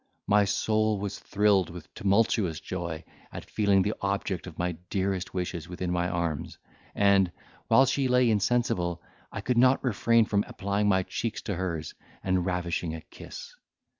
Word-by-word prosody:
My 105 0 +4
soul 110 +1 +1
was 100 0 -4
thrilled 100 -3 +2
with 85 -3 -11
tumultuous 100 -4 +1
joy, 85 -3 -5 0.3
at - - -8
feeling 100 -3 +3
the 105 +3 0
object 100 -2 -2
of 85 - -10
my 90 +1 0 0.2
dearest 95 -2 -2
wishes 90 -2 -3
within 90 0 -3
my 90 0 0
arms; 85 -1 -3 0.4
and, 100 -3 +4 0.4
while 130 - +6
she 135 0 +1
lay 125 0 +4
insensible, 105 -5 0 0.3
I - - -5
could 125 -1 +1
not 130 +2 +4
refrain 115 -1 +3
from 100 -1 +1
applying 100 +1 -1
my 95 -1 +3
cheeks 110 +3 -4
to 100 - -2
hers, 85 -4 -3 0.3
and 95 -1 +1
ravishing 85 -2 -2
a 80 - -7
kiss. - - -11
95 Hz, 160 wpm, -28 LUFS, 90-105 Hz, 0.4 s, while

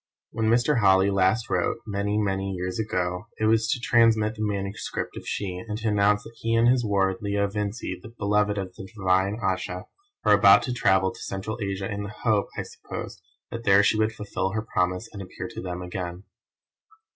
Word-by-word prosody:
When 110 -1 0
Mr. 120 +3 +3
Holly 95 -1 +4
last 100 +4 +2
wrote, - - 0
many, 105 0 -1
many 95 -2 -1
years 90 +2 -3
ago, 90 -2 -2
it 110 - 0
was 110 0 +3
to 125 - +1
transmit 115 -3 +3
the 110 - -8
manuscript 100 -1 -3
of - - -8
She, 95 -3 -3
and 105 -1 -3
to 115 0 -1
announce 105 0 +3
that 115 - -13
he 115 0 0
and 115 +1 +4
his 125 0 +4
ward, 100 -2 +1
Leo 100 0 0
Vincey, 105 +2 -4
the - - -10
beloved 105 -2 0
of 95 -2 -4
the 95 - -9
divine 95 +1 +2
Ayesha, 95 -1 -2 0.4
were - - +6
about - - +7
to 125 - -2
travel 95 -5 +3
to - - -13
Central 105 +4 -4
Asia 100 -1 -2
in 100 0 -4
the 100 - -5
hope, 110 -4 +2
I - - -1
suppose, - - -8 0.3
that 115 -1 -5
there 100 -1 +6
she 105 - +3
would 110 0 +2
fulfil 100 -3 -3
her 110 -1 -1
promise 90 0 -1
and 100 - -7
appear 95 - -7
to - - -7
them 90 -1 -5
again. 90 0 -5
100 Hz, 200 wpm, -25 LUFS, 95-110 Hz, 0.4 s, about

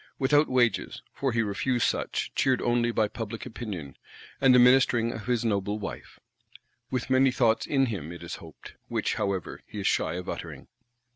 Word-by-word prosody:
Without 145 +2 +3
wages, 120 -4 +1
for 135 -1 -1
he 115 0 +1
refused 115 +4 0
such; - - -2
cheered 130 -2 +2
only 120 0 +2
by 110 -2 +1
Public 115 +1 -6
Opinion, 105 - -6 0.5
and 130 -2 +6
the - - +7
ministering 125 -2 +4
of 105 -3 -8
his 120 -2 0
noble 100 -1 0
Wife. 105 - -8 0.7
With 130 0 -3
many 130 +1 +5
thoughts 120 -3 +2
in 135 -2 +2
him, 95 - -4
it 85 0 -9
is 85 - -6
hoped;—which, 80 -2 -5
however, 95 -3 -3
he 105 - -7
is - - -5
shy - - +1
of 90 0 -6
uttering. - - -7
115 Hz, 170 wpm, -27 LUFS, 100-130 Hz, 0.7 s, the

